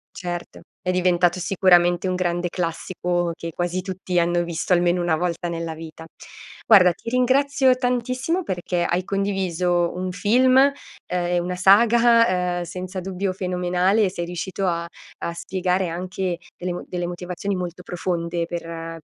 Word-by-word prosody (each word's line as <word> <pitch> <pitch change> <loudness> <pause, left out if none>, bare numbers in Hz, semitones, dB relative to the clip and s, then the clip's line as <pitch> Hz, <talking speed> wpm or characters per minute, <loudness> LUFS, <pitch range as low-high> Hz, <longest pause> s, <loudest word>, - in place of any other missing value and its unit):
Certo, 175 -1 -6 0.2
è 180 - -1
diventato 180 -1 +2
sicuramente 180 -1 +3
un 185 - 0
grande 175 -1 -1
classico 175 0 -2
che 165 0 -6
quasi 175 +2 -2
tutti 185 -1 -3
hanno 175 0 +2
visto 170 +1 -2
almeno 175 0 +3
1 175 -2 +1
volta 175 +1 -2
nella 165 -1 -4
vita. 160 0 -10 0.6
Guarda 185 -5 +7
ti 190 - -11
ringrazio 260 +2 +3
tantissimo 255 +7 -1
perché 180 - -2
hai 175 +1 0
condiviso 185 -3 0
un 185 +1 -3
film, 250 +7 +3
ehm, 280 +1 +6 0.3
e 175 0 0
una 175 +1 -2
saga, 205 -2 +4
uhm, 175 - -3
senza 185 +2 -6
dubbio 190 +1 -3
fenomenale, 180 +2 +1
e 190 - +1
sei 175 -2 -4
riuscito 180 +2 -3
a 170 -1 -1 0.3
a 170 - -3
spiegare 180 +1 -1
anche 180 +1 -3 0.2
delle 180 0 -3
mo 175 - -6
delle 175 -1 -3
motivazioni 180 +3 -4
molto 180 -1 -5
profonde 170 -1 -2
per 165 -1 -6
180 Hz, 150 wpm, -23 LUFS, 175-190 Hz, 0.6 s, Guarda